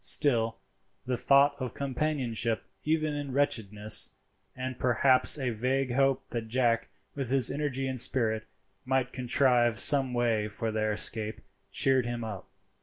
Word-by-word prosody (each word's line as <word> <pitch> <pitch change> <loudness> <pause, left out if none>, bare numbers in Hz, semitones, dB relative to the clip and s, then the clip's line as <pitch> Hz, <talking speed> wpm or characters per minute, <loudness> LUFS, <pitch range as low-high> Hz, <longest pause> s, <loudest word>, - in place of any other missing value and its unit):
Still 115 -6 +3 0.5
the 125 0 -2
thought 140 +3 +3
of 125 -3 -6
companionship, 130 -5 -2 0.2
even 155 0 -1
in 145 -2 -5
wretchedness, 110 -7 +3 0.4
and 130 0 -6
perhaps 130 +3 +3
a 130 -4 -2
vague 130 +3 -2
hope 135 0 0
that 115 -2 -5
Jack, 115 -1 0 0.2
with 135 -4 -4
his 130 -2 +4
energy 140 -2 -3
and 130 -2 0
spirit, 110 -4 +3 0.4
might 130 -1 -1
contrive 125 -2 +1
some 135 -2 +3
way 115 -3 0
for 110 +2 -5
their 110 0 -1
escape, 105 +1 -2 0.3
cheered 130 -3 +1
him 120 -1 -4
up. 105 -4 -8
125 Hz, 140 wpm, -28 LUFS, 115-135 Hz, 0.5 s, his